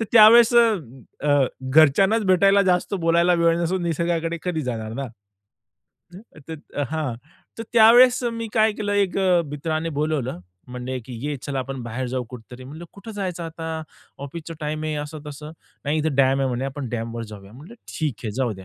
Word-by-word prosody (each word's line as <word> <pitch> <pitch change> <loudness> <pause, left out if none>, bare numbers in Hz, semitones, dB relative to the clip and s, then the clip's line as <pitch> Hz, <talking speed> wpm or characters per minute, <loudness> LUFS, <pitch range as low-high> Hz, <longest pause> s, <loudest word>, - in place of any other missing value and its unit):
तर 225 - 0
त्यावेळेस, 230 +2 +8
अ, 165 - 0
अ, 145 -2 +4 0.3
घरच्यांनाच 190 - +4
भेटायला, 195 +2 +4
जास्त 180 +1 +1
बोलायला 170 0 +2
वेळ 170 0 +2
नसून, 175 +2 -1
निसर्गाकडे 170 0 -1
कधी 170 -4 -2
जाणार 110 -3 -4
ना. 135 +3 -4 1.4
तर 160 - -5 0.4
हां, 155 -6 -2 0.4
तर - - -3
त्यावेळेस 240 +3 +6
मी 230 0 -4
काय 220 -1 +3
केलं, 205 -1 -3
एक 200 -2 +1
अ, 180 -3 +3
मित्राने 155 +2 -3
बोलावलं, 150 - -1 0.3
म्हणले 125 +1 -5
की 125 - -10
"ये, 150 - -2
चला 140 -1 -4
आपण 130 -1 -5
बाहेर 120 +2 -4
जाऊ 125 0 -3
कुठेतरी?" 125 +1 -11
म्हटलं, 155 +6 -9
"कुठं 210 +3 -11
जायचं 185 -4 -4
आता? 160 -1 -5 0.4
ऑफिसचा 165 +3 -8
टाईम 155 +1 -3
आहे, 155 -1 -2
असं 155 +1 -8
तसं." 150 +1 -8 0.3
"नाही 150 +2 0
इथं 155 -1 -1
डॅम 135 0 +3
आहे. 135 - +1
म्हणे. 125 +1 -2
आपण 135 -2 -5
डॅमवर 115 0 -4
जाऊया." 105 -1 -12
म्हटलं, 130 0 -13 0.2
"ठीक 150 -5 -1
आहे, 110 - -2
जाऊ 125 -2 -1
द्या 95 -1 -11
155 Hz, 175 wpm, -23 LUFS, 130-180 Hz, 1.4 s, त्यावेळेस